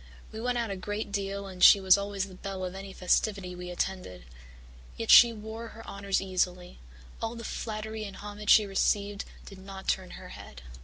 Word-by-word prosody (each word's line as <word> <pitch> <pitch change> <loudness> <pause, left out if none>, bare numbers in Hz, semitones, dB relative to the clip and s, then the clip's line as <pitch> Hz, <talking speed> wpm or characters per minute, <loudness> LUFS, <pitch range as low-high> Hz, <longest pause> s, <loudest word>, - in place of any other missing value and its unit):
We 220 - -7
went 245 +1 0
out 230 -3 -1
a - - -2
great 205 +2 -4
deal 200 0 -3
and 185 -2 -5
she 200 - +10
was 190 -1 +6
always 200 -1 -2
the 190 - -12
belle 190 0 -5
of 180 - -5
any 195 0 -8
festivity 190 0 0
we 180 0 -7
attended. 180 - -4 0.7
Yet 225 - 0
she 240 -1 +10
wore 220 +1 -7
her 225 0 -12
honours 200 -1 -1
easily; 180 -1 -2 0.4
all 225 +1 -3
the 230 - -8
flattery 220 -1 -5
and 200 - -8
homage 205 0 -7
she 215 - +7
received 200 +1 0 0.2
did 195 -2 -11
not 190 0 -10
turn 185 -1 -1
her - - -11
head. - - -11
200 Hz, 195 wpm, -29 LUFS, 190-215 Hz, 0.7 s, she